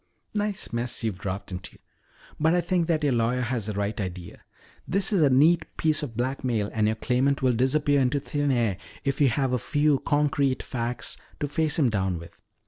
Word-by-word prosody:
"Nice 205 - -2
mess 120 0 0
you've 105 -5 -2
dropped 100 0 -5
into. 90 0 -7 0.6
But 160 +2 +3
I 175 - +3
think 175 -2 0
that 160 -3 +1
your 140 -3 +2
lawyer 120 +2 +1
has 120 -3 -1
the 105 - -2
right 100 +1 -2
idea. 90 -2 -7 0.5
This 195 +4 +2
is 190 - +3
a 145 - +5
neat 155 +6 +4
piece 155 -1 +2
of 120 -7 -6
blackmail 120 -4 -1
and 110 -1 +2
your 110 - +1
claimant 130 +4 0
will 130 -1 +4
disappear 140 +4 +2
into 130 +2 +1
thin 145 +1 -2
air 115 -7 +1 0.3
if 140 0 -1
you 140 - +6
have 130 +1 0
a 125 - +1
few 145 -1 +2
concrete 145 -2 +1
facts 120 -1 -3 0.2
to 145 - -1
face 155 +1 0
him 135 -7 +3
down 95 -4 0
with. 85 0 -11
130 Hz, 200 wpm, -26 LUFS, 115-150 Hz, 0.6 s, you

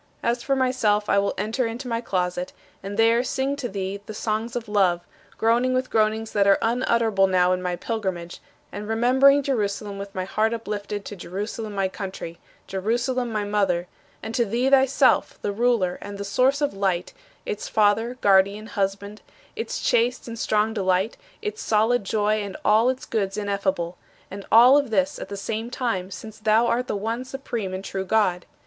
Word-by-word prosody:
As 235 +1 0
for 275 +2 0
myself 240 -6 +1
I 200 - +4
will 200 0 -1
enter 230 +3 -1
into 240 +3 -6
my 230 -1 -1
closet 180 -4 -2 0.3
and 200 +1 -6
there 230 +2 +4
sing 265 +2 -1
to 250 -4 -4
thee 195 0 -4
the 215 - -7
songs 220 +2 -2
of 240 -1 -3
love, 190 -4 +2 0.4
groaning 240 +3 +2
with 255 0 -1
groanings 220 0 +1
that 200 -1 +2
are 195 - +6
unutterable 230 -4 +2
now 180 -1 +3
in 180 - -2
my 180 -1 -2
pilgrimage, 185 -5 -4 0.3
and 205 +1 -6
remembering 260 +5 +4
Jerusalem 205 -5 -2
with 200 0 -8
my 185 -1 -2
heart 220 +4 0
uplifted 210 -2 -5
to 205 - -7
Jerusalem 205 +4 -5
my 195 -1 +1
country, 185 -3 -7 0.3
Jerusalem 235 +5 -1
my 215 -1 -1
mother; 195 -4 0 0.4
and 225 - -5
to 235 - +2
thee 240 +5 0
thyself, 270 0 +4
the 205 - 0
Ruler 215 -5 +1
of 205 0 -7
the 200 - -5
source 260 +7 +2
of 290 - +1
Light, 190 -3 -1 0.3
its 210 - -4
Father, 220 +4 +2
Guardian, 200 +2 +3
Husband; 200 0 -3 0.3
its 455 - -4
chaste 245 0 +1
and 230 -1 -7
strong 215 +1 +1
delight, 190 0 +1 0.3
its 430 0 -4
solid 225 +2 +2
joy 215 +1 +1
and 200 -1 -6
all 220 +4 +5
its 260 0 -3
goods 200 -3 -2
ineffable 195 -4 -2 0.3
and 200 +1 -8
all 250 +5 +8
of 280 -4 -3
this 280 +6 0
at - - -7
the 200 - -5
same 220 +3 -4
time, 230 -8 -2
since 215 +3 -9
thou 220 +2 +3
art 245 +1 0
the - - -2
one 225 +4 -3
supreme 250 -7 -5
and 185 +1 -5
true 190 -1 -3
Good! 185 -3 +1
215 Hz, 180 wpm, -24 LUFS, 195-240 Hz, 0.4 s, all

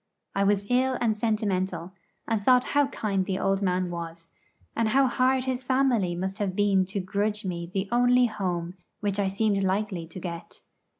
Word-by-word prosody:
I 200 - +1
was 200 0 +2
ill 255 +1 +2
and 225 -3 +1
sentimental, 200 -5 -1 0.4
and 225 -3 0
thought 250 +2 +5
how 290 -1 +4
kind 200 -7 -1
the 190 0 -2
old 195 +1 0
man 180 -2 0
was, 165 -1 -7 0.4
and 230 -1 +1
how 270 +5 +4
hard 255 +1 +2
his 260 -1 -2
family 250 -8 +1
must 190 +2 -4
have 195 -3 -1
been 195 -2 +3
to 190 +2 -4
grudge 205 +2 -2
me 170 -2 -4
the 195 +1 -2
only 245 +1 +4
home 180 -6 -2 0.3
which 205 -1 -1
I 200 - +2
seemed 200 +1 +1
likely 190 -3 -1
to 165 +3 -9
get. 170 -1 -7
200 Hz, 180 wpm, -27 LUFS, 185-235 Hz, 0.4 s, thought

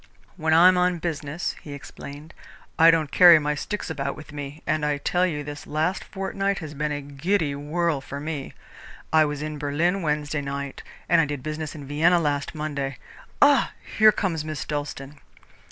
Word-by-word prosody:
"When 160 -3 -1
I 165 +3 +7
am 185 -1 +5
on 180 0 +2
business," 160 -1 -3
he 145 - -9
explained, 145 +2 -10 0.5
"I 165 +1 +8
don't 160 -3 +2
carry 175 -2 +9
my 150 -1 0
sticks 210 +7 -4
about 140 -3 -3
with 155 - -11
me, 145 +1 -7
and 155 -1 0
I 150 -1 +1
tell 180 +5 +1
you 150 -4 -3
this 145 0 -8
last 160 +5 -1
fortnight 195 0 -2
has 155 -4 -7
been 150 +1 -2
a 145 0 -3
giddy 145 +3 -1
whirl 150 +1 -1
for 140 +1 -7
me. 150 -2 -5 0.6
I 155 -1 +6
was 150 0 -4
in 155 -1 -5
Berlin 165 +7 0
Wednesday 150 -1 -1
night, 140 0 -5 0.3
and - - +5
I - - +2
did 145 -3 -5
business 155 0 -4
in 145 -2 -8
Vienna 160 +5 +3
last 145 -1 -1
Monday. 140 -4 -3 0.5
Ah! 285 -3 +4 0.3
here 215 0 +8
comes 170 -8 -2
Miss 155 -2 -5
Dalstan." 145 -1 -5
150 Hz, 185 wpm, -24 LUFS, 145-170 Hz, 0.6 s, carry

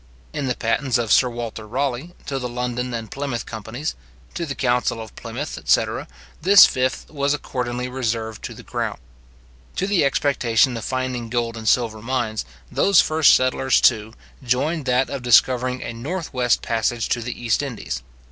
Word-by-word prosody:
In 140 - -2
the 125 - 0
patents 125 +3 0
of 115 -3 -2
Sir 125 - +5
Waiter 115 -2 -6
Raleigh, 135 +7 -2
to 135 -1 -3
the 125 -1 -4
London 125 +1 -3
and 115 -2 -5
Plymouth 135 -5 -3
companies, 115 +7 -5 0.4
to 170 -1 -3
the 135 - -4
council 125 -2 +1
of 110 -1 -9
Plymouth, - - -6
etc. - - +1 0.3
this 195 +3 +9
fifth 130 0 -1
was 140 -1 +1
accordingly 125 -3 -3
reserved 115 -4 -3
to - - -7
the - - -12
crown. - - -3 0.8
To 190 - 0
the 195 -4 +2
expectation 130 -3 +2
of 115 - -5
finding 130 -2 -3
gold 120 -1 -1
and 110 -1 -1
silver 110 -3 +1
mines, 115 - -2 0.3
those 200 - +4
first 155 -1 +5
settlers, 130 0 +2
too, 110 -2 +3 0.3
joined 135 +5 0
that 125 0 +1
of 140 -2 -4
discovering 125 +1 +3
a 120 - -5
north 155 +9 -5
west 125 -2 +2
passage 115 0 0
to 120 - 0
the 120 +1 -5
East 120 +1 +1
Indies. 110 - -5
125 Hz, 170 wpm, -22 LUFS, 115-135 Hz, 0.8 s, this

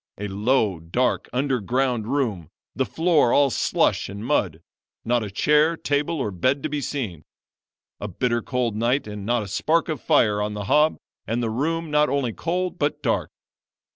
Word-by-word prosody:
A 105 - -4
low, 105 -2 +1
dark, 85 +11 -1
underground 125 -2 0
room, 115 - -1 0.3
the 130 - 0
floor 160 -7 +2
all 140 -2 +4
slush 95 - +1
and 100 +2 -7
mud 90 - 0 0.4
not 120 0 +1
a 105 - -5
chair, 150 - +3
table, 145 +3 -1
or 120 -7 -2
bed 130 +10 0
to 155 - -1
be 150 0 -2
seen. 110 - -4 0.8
A 105 - -4
bitter 120 +5 -1
cold 125 -2 -1
night 120 +6 +1
and 105 -1 -7
not 120 -2 +1
a - - -7
spark 160 - +1
of 155 - -3
fire 105 -9 +3
on 105 0 -2
the 105 - -4
hob 150 +8 +3 0.3
and 120 +2 -1
the 115 - -1
room 160 +6 -2
not 150 -1 +3
only 135 -4 -1
cold 180 - -2
but 145 0 -1
dark. - - 0
125 Hz, 175 wpm, -23 LUFS, 105-145 Hz, 0.8 s, all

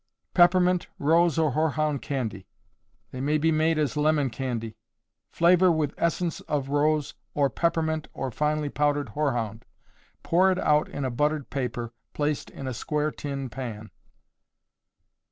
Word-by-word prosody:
Peppermint, 180 0 +4
Rose 165 +3 +3
or 160 -3 +2
Hoarhound 155 -1 0
Candy. 110 -9 -4 0.6
They 130 - -6
may 150 +3 +2
be 160 +2 +2
made 160 +1 +2
as 150 -1 0
lemon 150 -3 +2
candy. 115 -2 -4 0.5
Flavor 180 +1 +4
with 155 -3 0
essence 170 0 -1
of 140 -2 -1
rose 150 0 +1 0.2
or 140 -2 +2
peppermint 160 -2 0
or 135 -1 -4
finely 150 +3 0
powdered 145 -2 0
hoarhound. 115 -5 -2 0.6
Pour 185 +3 +4
it 185 - 0
out 150 -4 +2
in 140 - -4
a 130 - -1
buttered 150 +3 -1
paper, 120 -3 -3 0.2
placed 150 0 -1
in 135 - -8
a 130 - -3
square 150 +5 -1
tin 140 -2 -5
pan. 110 -3 -7
150 Hz, 140 wpm, -26 LUFS, 130-160 Hz, 0.6 s, Peppermint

